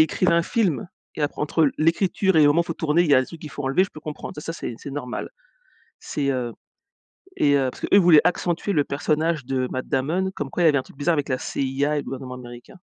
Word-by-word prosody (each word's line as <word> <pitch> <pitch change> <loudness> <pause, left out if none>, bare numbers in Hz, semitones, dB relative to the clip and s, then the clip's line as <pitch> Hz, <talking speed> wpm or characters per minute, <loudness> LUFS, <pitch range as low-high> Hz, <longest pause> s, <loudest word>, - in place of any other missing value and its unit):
écrivent 160 +3 +3
un 170 0 +4
film 185 - 0 0.3
et 155 - -2
après 145 - -2
entre 150 0 +2
l'écriture 180 +3 +2
et 155 -2 +7
au - - +6
moment 160 +4 +3
où 170 - 0
faut 165 - -3
tourner 160 +2 +2
il 175 - -1
y 140 - +7
a 130 - +6
des 130 - -3
trucs 165 - -11
qu'il 150 - -8
faut 145 - -6
enlever, 135 +8 +3
je 195 - -10
peux 155 - -11
comprendre 150 -1 -7
ça, 165 - -5
c'est 120 - -5
c'est - - -8
normal, 135 -3 -5 0.7
c'est, 140 -2 -2
heu, 125 -3 -2 0.9
et 145 - +3
heu, 135 -2 +2
parce - - -13
que, - - -2
eux, - - +8
voulaient 170 -5 +7
accentuer 180 +2 -1
le 145 - +3
personnage 155 +1 -1
de 130 0 -1
Matt 130 - -4
Damon 170 +9 0
comme 145 - -4
quoi 175 - -1
il - - +5
y - - +7
avait 145 - +3
un - - +1
truc - - -18
bizarre 150 +4 +1
avec 145 -3 -1
la 130 - +1
CIA 140 +3 -1
et - - +1
le - - -5
gouvernement 130 -1 -6
américain. 120 - -11
150 Hz, 265 wpm, -23 LUFS, 135-170 Hz, 0.9 s, eux